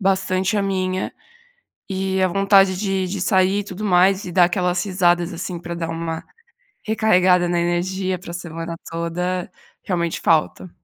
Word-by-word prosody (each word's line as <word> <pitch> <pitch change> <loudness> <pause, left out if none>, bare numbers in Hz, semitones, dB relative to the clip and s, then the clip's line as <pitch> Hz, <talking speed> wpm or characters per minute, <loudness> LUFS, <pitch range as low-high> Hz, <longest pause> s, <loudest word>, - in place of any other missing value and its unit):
bastante 190 +1 +1
a 200 - +1
minha, 185 -1 -2 0.8
e 190 0 -1
a 185 - +4
vontade 195 0 +4
de 195 -1 -1
de 190 +1 -4
sair 190 +2 +2
e - - -3
tudo 195 +1 -8
mais 190 +1 +3
e 180 - -6
dar 180 0 +5
aquelas 180 0 0
risadas, 175 -2 +1
assim, 170 +1 -5
pra 170 0 -6
dar 165 -1 -4
uma 165 0 -4 0.6
recarregada 185 -5 +3
na 175 0 +1
energia 185 +2 -1
para 170 - -10
a - - -7
semana 165 -1 -6 0.2
toda, 175 +2 -3 0.3
realmente 170 -3 -2
falta. 160 +3 +1
185 Hz, 160 wpm, -21 LUFS, 175-190 Hz, 0.8 s, dar